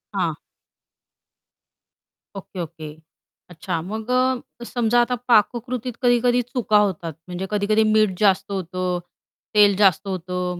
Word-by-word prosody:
हां. 170 -5 0 2.0
Okay, 190 -1 -9
okay. 155 -2 -8 0.6
अच्छा 165 -1 -4
मग 215 +6 -6 0.5
अ, - - -5
समजा 240 -1 +1
आता 250 +1 0
पाककृतीत 240 +1 +1
कधी-कधी 245 0 +3
चुका 240 -3 0
होतात. 185 -5 0
म्हणजे 180 +1 -5
कधी-कधी 210 +1 +2
मीठ 215 -4 +2
जास्त 200 -1 +2
होतं, 185 -1 -2 0.6
तेल 205 -1 +6
जास्त 195 -1 +3
होतं, 180 -1 -3
200 Hz, 115 wpm, -22 LUFS, 180-230 Hz, 2.0 s, तेल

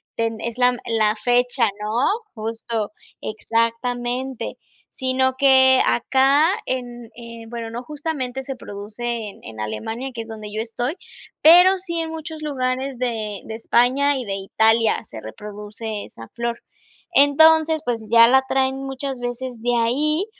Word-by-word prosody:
ten 225 -1 -2
es 235 +1 -4
la 250 0 +3
la 220 -2 +1
fecha, 245 +1 +2 0.2
¿no?, 210 - -3 0.4
justo, 225 -1 -3 0.3
exactamente. 240 +3 -2 0.4
Sino 260 0 +1
que 260 -1 +6
acá, 270 - +3 0.2
en, 245 -2 -4
eh, 230 -1 -10
bueno, 230 -1 -6
no, 240 +1 -5
justamente 275 -3 -4
se 270 0 -5
produce 220 +1 -5
en - - -14
en 110 -1 -10
Alemania, 220 - -4
que 230 - -5
es 225 - -9
donde 215 -1 -8
yo 215 - -2
estoy, 240 +5 -3 0.5
pero, 360 +4 +7
sí 340 -2 -3
en 320 0 -4
muchos 320 -1 -7
lugares 260 -2 -2
de 220 -5 -3
de 220 - -6
España 255 +5 +3
y 255 - -4
de 195 -1 -2
Italia 220 +3 +2
se 110 - -10
reproduce 210 - -7
esa 115 0 -12
flor. 235 0 -3 0.5
Entonces, 315 +2 +5
pues, 230 -2 -2
ya 230 0 +7
la 265 +2 +5
traen 265 0 0
muchas 270 -1 -5
veces 245 -1 -5
de 245 0 +1
ahí, 300 - +1
245 Hz, 145 wpm, -21 LUFS, 225-265 Hz, 0.5 s, pero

